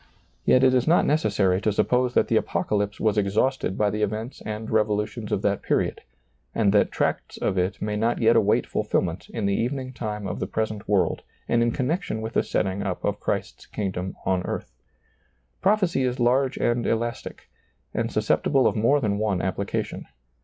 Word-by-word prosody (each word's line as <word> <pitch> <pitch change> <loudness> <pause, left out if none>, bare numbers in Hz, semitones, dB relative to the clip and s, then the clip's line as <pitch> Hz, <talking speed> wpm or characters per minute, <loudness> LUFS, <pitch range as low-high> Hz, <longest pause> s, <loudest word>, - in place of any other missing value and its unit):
Yet 130 - +5
it 130 -1 +5
is 125 +1 +2
not 170 +2 +4
necessary 100 -11 +2
to 110 - +1
suppose 125 +4 +1
that - - +4
the - - +1
Apocalypse 105 -1 0
was 105 -1 +2
exhausted 105 +2 0
by 105 -1 +2
the 105 - -3
events 110 +4 -3
and 110 +1 -4
revolutions 105 -1 -1
of - - 0
that - - +1
period, - - 0 0.5
and 105 -3 +3
that 105 - +3
tracts - - -2
of - - -1
it 90 +1 0
may 105 0 -2
not 115 +3 +1
yet 115 0 +4
await 105 -2 +3
fulfillment - - -1
in 110 - -3
the 100 - +2
evening 130 +4 -2
time 105 -4 -4
of 95 - -4
the - - -2
present 110 -2 -3
world 100 -3 +2 0.3
and 120 - +2
in 120 - +3
connection 130 - -1
with 110 +1 -5
the - - +3
setting 95 +2 -1
up 95 -3 -3
of - - -1
Christ's - - -3
kingdom 95 -2 -4
on 95 -1 +1
earth. - - -5 0.9
Prophecy 190 -7 +2
is 125 0 -1
large 130 +2 +2
and 120 0 0
elastic, 115 +1 -3 0.5
and - - -1
susceptible 135 -3 +2
of - - +3
more 115 +7 +3
than 105 -5 -1
one 105 -4 0
application. 95 +2 -3
110 Hz, 180 wpm, -25 LUFS, 100-125 Hz, 0.9 s, Yet